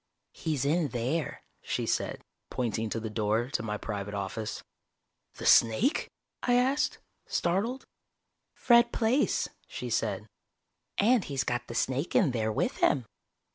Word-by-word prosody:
"He's 150 Hz, -4 st, -2 dB
in 160 Hz, +2 st, +2 dB
there," 130 Hz, +5 st, -2 dB, 0.2 s
she -, -, -2 dB
said, -, -, -1 dB, 0.3 s
pointing 115 Hz, -2 st, -1 dB
to 115 Hz, -, -2 dB
the 110 Hz, -, -4 dB
door 110 Hz, +4 st, 0 dB
to -, -, 0 dB
my 105 Hz, -1 st, -3 dB
private 105 Hz, -1 st, -4 dB
office. 100 Hz, +2 st, -4 dB, 0.7 s
"The -, -, -7 dB
snake?" 200 Hz, -, +4 dB, 0.3 s
I 245 Hz, -, +2 dB
asked, 260 Hz, +4 st, +2 dB, 0.3 s
startled. 205 Hz, +10 st, 0 dB, 0.7 s
"Fred 235 Hz, -1 st, +5 dB
Plaice," 240 Hz, +5 st, +2 dB, 0.2 s
she -, -, -6 dB
said. -, -, 0 dB, 0.7 s
"And 230 Hz, 0 st, +4 dB
he's 140 Hz, -2 st, -1 dB
got 120 Hz, 0 st, -2 dB
the 115 Hz, -, -7 dB
snake 135 Hz, +6 st, -1 dB
in 160 Hz, -9 st, +4 dB
there 110 Hz, -2 st, 0 dB
with -, -, -1 dB
him." 130 Hz, -5 st, +2 dB
130 Hz, 135 wpm, -29 LUFS, -, 0.7 s, Fred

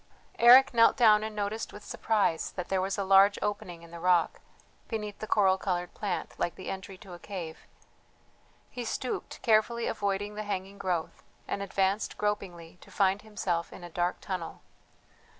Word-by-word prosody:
Eric 250 Hz, +3 st, +8 dB
knelt 230 Hz, +2 st, +5 dB
down 215 Hz, -4 st, +6 dB
and 220 Hz, 0 st, -5 dB
noticed 210 Hz, +2 st, -3 dB
with 205 Hz, 0 st, -11 dB
surprise 205 Hz, -7 st, 0 dB
that 180 Hz, -2 st, -5 dB
there 190 Hz, -1 st, +1 dB
was 195 Hz, +2 st, -2 dB
a 200 Hz, -, 0 dB
large 195 Hz, +1 st, +5 dB
opening 200 Hz, -5 st, -4 dB
in 170 Hz, -, -14 dB
the 170 Hz, -, -8 dB
rock, 175 Hz, -1 st, +2 dB, 0.5 s
beneath 210 Hz, -3 st, -5 dB
the 215 Hz, -, -5 dB
coral 190 Hz, -3 st, +3 dB
coloured 180 Hz, -2 st, -2 dB
plant, 200 Hz, -4 st, -3 dB
like 175 Hz, -, -1 dB
the 185 Hz, -, -6 dB
entry 190 Hz, 0 st, -7 dB
to 190 Hz, -3 st, -12 dB
a 175 Hz, -, -10 dB
cave; 175 Hz, -6 st, -7 dB, 1.0 s
he 245 Hz, -, -5 dB
stooped, 245 Hz, +2 st, -4 dB
carefully 230 Hz, +1 st, +2 dB
avoiding 205 Hz, +1 st, -2 dB
the 210 Hz, -, -5 dB
hanging 200 Hz, -1 st, -5 dB
growth, 175 Hz, -4 st, -2 dB, 0.3 s
and 200 Hz, -, -3 dB
advanced 195 Hz, +1 st, -1 dB
gropingly 180 Hz, -5 st, -3 dB
to -, -, -16 dB
find 195 Hz, 0 st, +1 dB
himself 190 Hz, -6 st, -3 dB
in 175 Hz, -, -11 dB
a 175 Hz, -, -9 dB
dark 175 Hz, +2 st, -1 dB
tunnel. 185 Hz, -4 st, -5 dB
195 Hz, 170 wpm, -29 LUFS, 180-210 Hz, 1.0 s, Eric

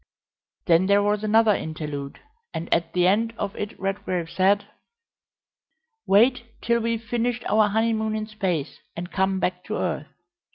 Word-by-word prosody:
Then 170 Hz, +2 st, +4 dB
there 200 Hz, 0 st, +4 dB
was 205 Hz, +1 st, 0 dB
another 215 Hz, 0 st, +4 dB
interlude, 150 Hz, -5 st, -5 dB, 0.4 s
and 165 Hz, -, -2 dB
at 165 Hz, -1 st, 0 dB
the 180 Hz, -1 st, +3 dB
end 225 Hz, +5 st, +2 dB
of 200 Hz, -, -3 dB
it 210 Hz, -, -6 dB
Redgrave 185 Hz, -3 st, -3 dB
said: 200 Hz, +2 st, +2 dB, 1.4 s
"Wait 235 Hz, +3 st, +3 dB
till 235 Hz, 0 st, +1 dB
we've 230 Hz, 0 st, -1 dB
finished 240 Hz, +1 st, -1 dB
our 215 Hz, 0 st, +4 dB
honeymoon 220 Hz, 0 st, 0 dB
in 215 Hz, 0 st, -2 dB
space, 185 Hz, -9 st, -3 dB, 0.2 s
and 175 Hz, +1 st, -6 dB
come 190 Hz, 0 st, +1 dB
back 180 Hz, 0 st, -2 dB
to 215 Hz, -, -3 dB
earth. 160 Hz, -4 st, -2 dB
200 Hz, 150 wpm, -24 LUFS, 180-220 Hz, 1.4 s, Then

